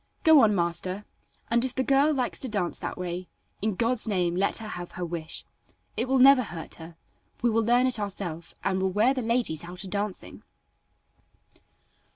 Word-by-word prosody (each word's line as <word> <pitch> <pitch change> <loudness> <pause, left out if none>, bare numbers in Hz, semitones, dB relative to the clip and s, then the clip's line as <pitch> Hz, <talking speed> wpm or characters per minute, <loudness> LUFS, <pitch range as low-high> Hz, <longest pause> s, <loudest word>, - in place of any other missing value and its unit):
"Go 320 -2 +8
on 210 -2 +4
master, 180 +3 -2 0.5
and 235 +1 +3
if 260 -1 -2
the 260 - +1
girl 275 +3 +4
likes 255 -5 -1
to 260 - -2
dance 200 -5 -1
that - - -5
way, 180 0 -4 0.3
in 210 -1 0
God's 230 +2 +1
name 180 -4 0
let 195 +2 +2
her 220 -2 -6
have 175 -4 -7
her 180 - -4
wish. 165 -2 -4 0.5
It 245 +3 -2
will 265 - +3
never 265 0 +7
hurt 175 -8 -7
her; 165 0 -11 0.5
we 240 - +3
will 225 +1 +2
learn 240 +3 +3
it 255 -3 0
ourself, 185 -5 -5
and 190 -1 0
will 190 - +1
wear 215 +7 +3
the 260 - -2
ladies 230 -9 0
out 180 +2 -7
a - - -7
dancing." 200 +1 -4
205 Hz, 190 wpm, -27 LUFS, 180-245 Hz, 0.5 s, Go